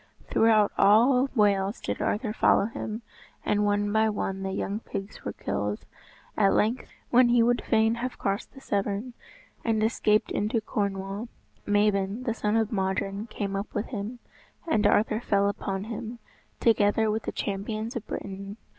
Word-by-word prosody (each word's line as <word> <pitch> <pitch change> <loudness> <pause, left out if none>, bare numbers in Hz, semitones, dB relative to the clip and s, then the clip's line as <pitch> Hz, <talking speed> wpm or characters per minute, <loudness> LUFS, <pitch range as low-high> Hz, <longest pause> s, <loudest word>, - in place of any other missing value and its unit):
Throughout 220 -2 +4
all 250 +6 +5
Wales 200 -1 +2
did - - -4
Arthur 215 0 -1
follow 200 - +4
him, 220 +1 -5 0.4
and 210 0 +2
one 205 0 +1
by 220 0 +3
one 195 -2 -3
the 190 0 -3
young 200 +2 -2
pigs 195 -3 -7
were - - -3
killed. 105 0 -3 0.5
At 195 -2 +3
length, 230 +4 +1 0.2
when 245 0 +6
he 240 -1 +5
would 245 +1 +2
fain 220 0 +3
have 255 0 -3
crossed 195 +1 -2
the 270 - -12
Severn, 205 +2 -2 0.5
and 220 -2 +1
escaped 215 -1 +2
into 215 +3 0
Cornwall, 200 0 -3 0.4
Mabon, 205 +1 +1
the 235 -3 0
son 210 -2 -1
of 220 -2 0
Modron, 195 +1 -1
came 200 -3 -4
up 195 +2 -4
with 210 - -2
him, 220 +1 -5 0.5
and 215 -9 +3
Arthur 215 +1 +2
fell 200 -3 +2
upon 195 -1 -3
him, 225 +1 -6 0.4
together 220 -1 +3
with 220 +1 -1
the - - -4
champions 215 +4 -3
of 230 -2 -5
Britain. 195 +1 -6
210 Hz, 160 wpm, -27 LUFS, 200-225 Hz, 0.5 s, when